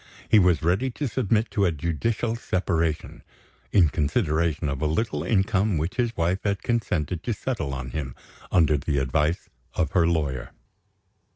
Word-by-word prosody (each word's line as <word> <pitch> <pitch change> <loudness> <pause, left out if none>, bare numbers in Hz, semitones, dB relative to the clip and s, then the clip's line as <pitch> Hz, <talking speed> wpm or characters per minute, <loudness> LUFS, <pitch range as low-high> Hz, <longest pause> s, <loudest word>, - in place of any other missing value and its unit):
He 110 - +6
was 90 -4 +3
ready 95 +11 +2
to 140 +3 -3
submit 115 -2 0
to 100 - +2
a 90 - +3
judicial 85 +9 -1
separation; 85 -7 -1 0.5
in 90 -6 +5
consideration 80 0 0
of 70 -1 -3
a 80 - +2
little 80 -1 -1
income 95 +1 +1
which 80 - -3
his 120 -2 0
wife 85 +3 +1
had 100 -1 -1
consented 90 -8 -1
to 115 +2 -2
settle 100 - -3
on 65 -2 -5
him, 70 -5 -4 0.4
under 80 -4 +4
the 70 +1 -1
advice 75 +5 0 0.3
of 80 - 0
her 85 -2 +3
lawyer. 75 -6 -1
85 Hz, 160 wpm, -25 LUFS, 75-105 Hz, 0.5 s, He